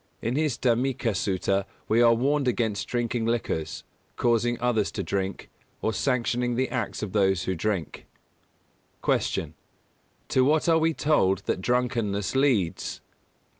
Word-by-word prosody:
In 115 +3 -2
his 150 -4 0
Dhammika 120 -1 +1
Sutta 95 +1 0 0.2
we 115 +2 +3
are 115 -1 +6
warned 140 +3 +1
against 115 -4 0
drinking 120 -1 -1
liquors, 95 -9 -2 0.3
causing 120 0 +1
others 115 -4 +1
to - - -3
drink, 95 -1 -3 0.3
or 110 - -1
sanctioning 125 -1 0
the 130 +2 0
acts 120 -4 -3
of 105 - -4
those 95 -3 +2
who 95 - -1
drink. 95 -2 -3 1.0
204. - - +4
Q. - - -3 0.8
_To 130 - +3
what 150 +5 +2
are 165 -1 +5
we 160 0 +1
told 95 - +2
that 95 - -1
drunkenness 115 -4 0
leads? 125 - +1
115 Hz, 140 wpm, -26 LUFS, 100-125 Hz, 1.0 s, are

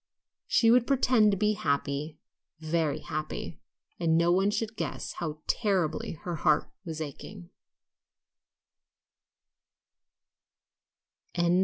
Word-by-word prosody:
She 245 - +4
would 240 0 +4
pretend 250 -5 +4
to 200 - +1
be 210 +2 +2
happy, 145 -2 -2 0.4
very 160 -1 0
happy, 155 0 -5 0.4
and 165 -2 +3
no 170 +1 +3
one 190 +3 +3
should 220 +1 -2
guess - - -4
how 155 -2 -4
terribly 185 -8 0
her 175 -2 -3
heart 150 0 +2
was 160 -3 -5
aching. 170 +5 -8
175 Hz, 100 wpm, -29 LUFS, 155-210 Hz, 0.4 s, She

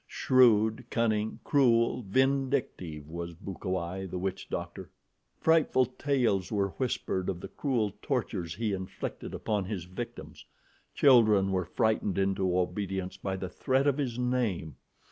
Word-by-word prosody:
Shrewd, 115 -2 +3
cunning, 110 -2 0
cruel, 120 -4 +3
vindictive, 130 - 0
was 85 +1 -6
Bukawai, 95 +1 -4
the 90 - -5
witch 95 +1 -4
doctor. - - -5 0.5
Frightful 160 -5 +4
tales 125 -7 0
were 100 -2 +1
whispered 95 -5 -2
of 90 - -3
the - - -7
cruel 115 -8 -1
tortures 100 - -2
he 110 0 -1
inflicted 95 0 -5
upon 105 -3 -1
his 95 -3 -4
victims. 90 +2 -8 0.5
Children 110 -8 +5
were 95 -2 0
frightened 105 +1 0
into 95 -2 +1
obedience 95 +1 -2
by 95 -1 -3
the 95 0 -4
threat 130 +8 0
of 145 0 +2
his 125 -5 -2
name. 120 - -1
105 Hz, 130 wpm, -29 LUFS, 95-125 Hz, 0.5 s, Children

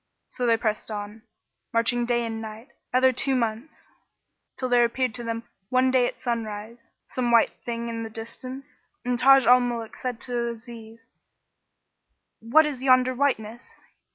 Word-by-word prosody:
So 245 - -2
they 230 -1 +4
pressed 215 -1 -2
on, 210 +1 -6 0.5
marching 235 +1 +2
day 240 -1 +1
and 225 -1 -4
night, 220 +2 -9 0.2
other 255 +1 +4
two 270 +2 +1
months, 235 +4 -3 0.7
till 255 - -2
there 245 -1 +4
appeared 245 0 0
to 240 - -4
them 230 0 -3 0.3
one 255 0 +3
day 255 -2 +3
at - - -7
sunrise 230 -1 -5 0.2
some 250 -2 -2
white 235 -1 +5
thing 235 0 -4
in 230 -1 -4
the 225 - -5
distance 255 +4 -9 0.3
and 245 -1 0
Taj 270 -1 +6
al 250 +1 +7
Muluk 240 -2 -3
said 250 -3 -4
to 240 -1 -2
Aziz, 230 -1 -11 1.3
"What 260 +8 +4
is 285 -4 -4
yonder 255 -1 +4
whiteness?" 240 -4 -2
235 Hz, 155 wpm, -25 LUFS, 225-255 Hz, 1.3 s, al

